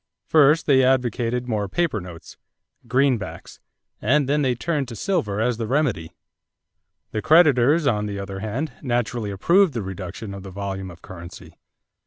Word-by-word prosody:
First 155 +1 +4
they 135 -3 +4
advocated 125 -1 +1
more 105 -4 -2
paper 150 - 0
notes 90 -2 -11 0.5
greenbacks 125 -2 -1 0.4
and 140 +4 +2
then 150 +2 +1
they 130 -3 +1
turned 145 +1 -2
to 115 - -8
silver 115 - -1
as 115 +1 0
the 115 -2 -3
remedy. 125 - 0 1.0
The 110 - -2
creditors, 150 -1 +5
on 105 -5 +1
the 100 -1 -4
other 100 0 -6
hand, 120 +10 -3
naturally 120 -4 -1
approved 170 - +3
the 115 - -2
reduction 95 +2 -7
of 100 - -8
the 95 - -9
volume 95 0 -5
of 85 -1 -14
currency. 85 -2 -11
120 Hz, 155 wpm, -23 LUFS, 100-140 Hz, 1.0 s, creditors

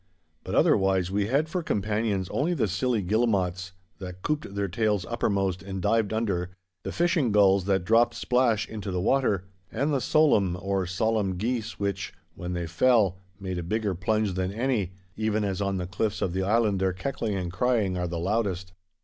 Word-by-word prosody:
But - - -4
otherwise 95 -2 +3
we 100 0 0
had 140 +6 +1
for 180 +2 -2
companions 105 - -1
only 165 +6 0
the 125 -8 +1
silly 105 +4 0
guillemots 95 -3 0 0.3
that 90 -1 -8
couped 150 -9 -2
their 100 0 0
tails 105 0 0
uppermost 95 -5 -1
and 95 -1 -5
dived 110 +2 +1
under, 100 -6 -1 0.3
the - - -5
fishing 170 - +1
gulls 100 -2 +4
that 95 -2 +1
dropped 115 +3 +4
splash 120 -4 +1
into 105 -2 -6
the 90 -1 -1
water, 105 -3 +1 0.3
and 140 +6 0
the 135 - +1
solan 110 - +3
or 95 0 -2
solemne 100 0 0
geese 115 +2 -2
which, 100 -1 -2 0.2
when 90 0 -5
they 85 -1 -2
fell, 95 +2 +3 0.2
made 95 -2 -4
a - - -2
bigger 105 +3 -1
plunge 105 +3 0
than 95 0 -1
any, 110 -4 -1 0.2
even 110 0 0
as 100 -1 -2
on 100 -1 0
the 90 - -3
cliffs 100 +4 -2
of 90 - -1
the 95 - -1
island 105 0 +2
their 95 -1 +1
keckling 105 +1 -3
and 90 -2 -3
crying 105 -2 +1
are 90 -1 -1
the 85 0 -4
loudest. 95 -1 -1
100 Hz, 185 wpm, -27 LUFS, 95-115 Hz, 0.3 s, gulls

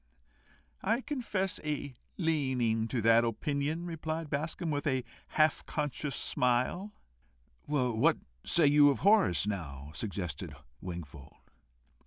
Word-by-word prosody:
"I 225 +6 +1
confess 220 -10 -2
a 150 -3 -3 0.2
leaning 130 - +1
to 120 0 -1
that 115 +1 +5
opinion," 140 +8 -1
replied 160 -2 -4
Bascombe, 155 +3 -2
with 145 0 -1
a 130 -3 +1 0.2
half 155 -1 +2
conscious 150 -2 -2
smile. 125 +11 +1 0.8
"What 130 +1 +3
do - - -19
you - - -31
say 145 -3 +6
of 140 - -4
Horace, 105 - +4
now?" 75 -9 -5
suggested 90 -6 -4 0.3
Wingfold. 85 -6 -8
140 Hz, 115 wpm, -31 LUFS, 110-160 Hz, 0.8 s, say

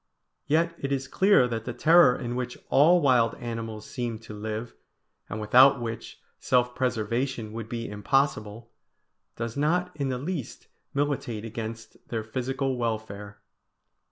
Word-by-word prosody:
Yet 165 +3 +2
it 140 - -3
is 135 -1 -1
clear 190 -4 +4
that 115 -2 -4
the 120 - -4
terror 160 -1 +6
in 120 -2 -4
which 125 0 -4
all 170 +6 +5
wild 125 -5 +3
animals 115 -2 -6
seem 120 -2 -3
to 115 -1 -10
live, 110 +2 -5 0.6
and 105 - -4
without 130 +6 +6
which 115 -1 -6 0.2
self 125 -1 +2
preservation 120 -1 -1
would 115 -1 -6
be 115 0 -4
impossible, 110 0 -1 0.6
does 115 -1 -4
not 175 +5 0
in 140 -3 -2
the 130 - -1
least 150 0 -5 0.3
militate 135 -6 -1
against 115 0 -7
their 115 -2 -3
physical 130 +3 -2
welfare. 110 -3 -4
120 Hz, 140 wpm, -27 LUFS, 115-135 Hz, 0.6 s, terror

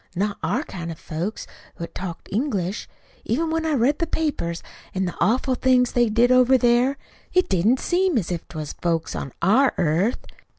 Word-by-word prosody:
Not 200 +3 -1
our 265 - 0
kind 170 - -6
of 160 - -8
folks 170 +8 -5 0.3
what 170 - -7
talked 180 -3 -6
English. 205 -5 -2 0.3
Even 320 +8 -1
when 325 0 0
I 315 - +1
read 275 +3 +2
the 335 - 0
papers, 285 - -2 0.3
an' 190 0 0
the 175 - -3
awful 255 +4 +2
things 250 -1 +3
they 240 -2 +2
did 235 +3 +3
over 255 +1 +6
there 245 +2 +3 0.4
it 365 0 +3
didn't 200 +8 +2
seem 360 -3 +1
as 180 -5 -1
if 170 -1 -4
't 160 - -10
was 155 -2 -5
folks 165 -2 -2
on 135 - -5
our 250 +9 +4
earth. 175 +8 +1
235 Hz, 185 wpm, -23 LUFS, 175-265 Hz, 0.4 s, over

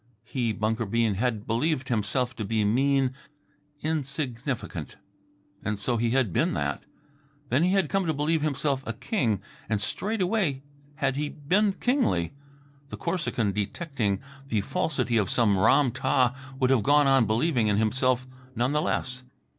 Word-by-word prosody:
He, 120 -4 -1
Bunker 110 +1 -1
Bean, 115 0 +2
had 110 0 -1
believed 130 +3 0
himself 120 +3 0
to 110 - -3
be 105 +1 0
mean, 135 +4 +2 0.7
insignificant. 140 -5 -3 0.7
And 105 -1 -1
so 120 +4 -1
he 115 +1 +1
had 120 -7 +1
been - - +1
that. - - -2 0.6
Then 130 +4 +3
he 180 +2 +3
had 195 -5 +3
come 195 +2 0
to 160 - +1
believe 155 +2 +1
himself 145 -2 0
a 115 - -1
king, 115 - -1 0.3
and 110 -2 +1
straightway 185 - -1 0.3
had 135 -2 0
he 150 0 -1
been 190 +9 +1
kingly. 240 - +1 0.6
The - - -6
Corsican, 160 - -1
detecting 105 - -2 0.3
the 110 -5 0
falsity 135 - 0
of 105 -4 +1
some 105 -5 +3
Ram 130 +5 +4
tah, 130 0 +2 0.2
would 130 -1 +3
have 130 -4 +4
gone 145 +6 +4
on 135 -4 +4
believing 120 +1 +2
in 105 -1 +2
himself 130 +3 +1 0.3
none 120 +3 +1
the 150 +1 +2
less. 125 -4 -2
130 Hz, 155 wpm, -27 LUFS, 110-150 Hz, 0.7 s, Ram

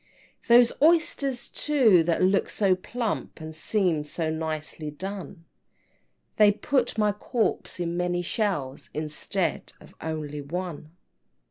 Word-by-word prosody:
XI. 235 - -5
"Those 240 -1 +7
oysters, 295 -5 +2
too, 250 - +4
that 170 +1 +1
look 190 +2 +2
so 195 -3 +2
plump, 225 +3 -4
And 160 0 -7
seem 170 -1 0
so 155 +2 -3
nicely 155 -1 -4
done, 190 +2 -7 0.9
They 210 -1 +7
put 245 +3 0
my 210 -1 +3
corpse 215 -2 -1
in 170 -1 -2
many 175 0 0
shells, 175 - -2
Instead 155 +3 -2
of - - -16
only 150 -2 -4
one." 160 0 -5
180 Hz, 125 wpm, -26 LUFS, 160-215 Hz, 0.9 s, Those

